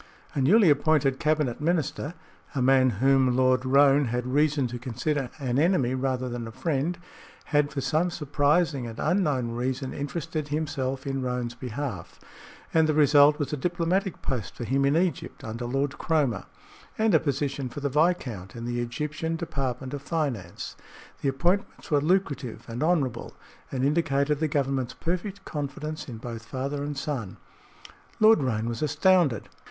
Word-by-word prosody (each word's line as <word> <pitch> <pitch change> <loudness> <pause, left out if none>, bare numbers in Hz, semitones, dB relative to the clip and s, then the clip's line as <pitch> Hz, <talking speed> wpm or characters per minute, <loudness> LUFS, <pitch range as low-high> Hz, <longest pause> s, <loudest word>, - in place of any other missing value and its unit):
A 140 - 0
newly 185 - +6
appointed 145 -2 +2
cabinet 150 -5 0
minister 160 0 -1 0.4
a - - 0
man 130 0 +5 0.2
whom 135 -2 +4
Lord 130 0 +3
Roane 140 +2 +5
had 120 +1 -2
reason 145 +1 +2
to 120 0 -5
consider 130 +2 -2
an 130 -2 0
enemy 155 -7 +2
rather 130 -1 -1
than 120 -2 -4
a - - -7
friend 160 +5 -1 0.6
had 145 0 +3
for 145 -2 -3
some 155 +7 +1
surprising 150 -3 +1
and 115 - -8
unknown 150 -9 +1
reason 130 +2 -2
interested 155 +1 -4
himself 140 -3 -2
in 135 -1 -2
Roane's 125 -2 -2
behalf, 120 -7 -6 0.5
and 160 -1 +4
the 155 - +2
result 145 0 +6
was 145 -1 -3
a - - 0
diplomatic 175 +4 -1
post 125 -6 -3
for - - -5
him 135 +4 +1
in 140 +3 +3
Egypt 175 -4 -1
under 115 +2 -5
Lord 135 +3 -1
Cromer, 145 - +1 0.5
and 220 -1 +2
a - - +6
position 140 -2 -2
for 145 - -7
the 140 - 0
viscount 140 - 0
in 115 0 -6
the 120 0 -2
Egyptian 150 +7 -3
Department 135 -6 -3
of 145 - -4
Finance. 140 - -3 0.5
The 140 - +1
appointments 175 +8 -1
were 145 -1 +4
lucrative 140 - 0
and 115 +2 -5
honorable, 145 -8 0 0.4
and 130 -1 0
indicated 145 -1 +1
the 160 - +1
Government's 135 -3 -1
perfect 185 +4 -3
confidence 150 +1 -5
in 115 - -6
both 115 0 -7
father 140 +4 -3
and 145 -1 -4
son. 135 - -4 0.8
Lord 220 -2 +6
Roane 115 -4 -1
was 115 -1 -3
astounded. 160 - +3
140 Hz, 160 wpm, -27 LUFS, 125-155 Hz, 0.8 s, newly